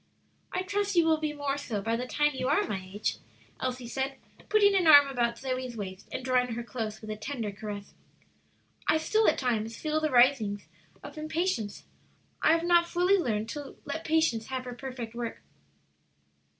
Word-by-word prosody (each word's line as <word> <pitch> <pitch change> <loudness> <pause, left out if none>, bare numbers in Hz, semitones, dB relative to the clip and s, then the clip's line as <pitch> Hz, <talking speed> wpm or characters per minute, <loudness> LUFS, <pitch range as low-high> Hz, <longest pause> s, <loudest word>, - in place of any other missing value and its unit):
"I 370 - -1
trust 405 +1 -1
you 340 -2 +5
will 320 -1 +3
be 305 -1 -1
more 285 -1 -2
so 230 -7 -3
by 225 +3 -1
the 250 +2 -3
time 295 +3 +2
you 255 -1 -2
are 295 - +3
my 195 -3 -3
age," 205 +2 -2 0.4
Elsie 255 -1 -3
said, 270 +2 -2 0.3
putting 410 -2 +5
an 370 -4 +3
arm 285 -2 +9
about 240 -3 0
Zoe's 255 -2 -4
waist 190 -2 -7
and 255 - -4
drawing 250 -2 +2
her 240 - -4
close, 220 -3 -5
with 215 -1 -6
a - - -3
tender 225 -2 -4
caress. 205 0 -7 0.9
"I - - +5
still 435 +8 +2
at - - 0
times 230 -3 -1
feel 310 0 0
the 310 - +1
risings 240 -6 +3 0.4
of 290 +2 -8
impatience; 310 - -2 0.6
I - - +5
have 330 0 +1
not 345 0 +4
fully 360 +3 +3
learned 220 -8 -1
to 290 +2 -7
'let 320 +3 -4
patience 315 -9 +1
have 260 -1 -4
her 250 - -5
perfect 245 -3 -6
work.' 235 -1 -5
260 Hz, 185 wpm, -29 LUFS, 230-310 Hz, 0.9 s, arm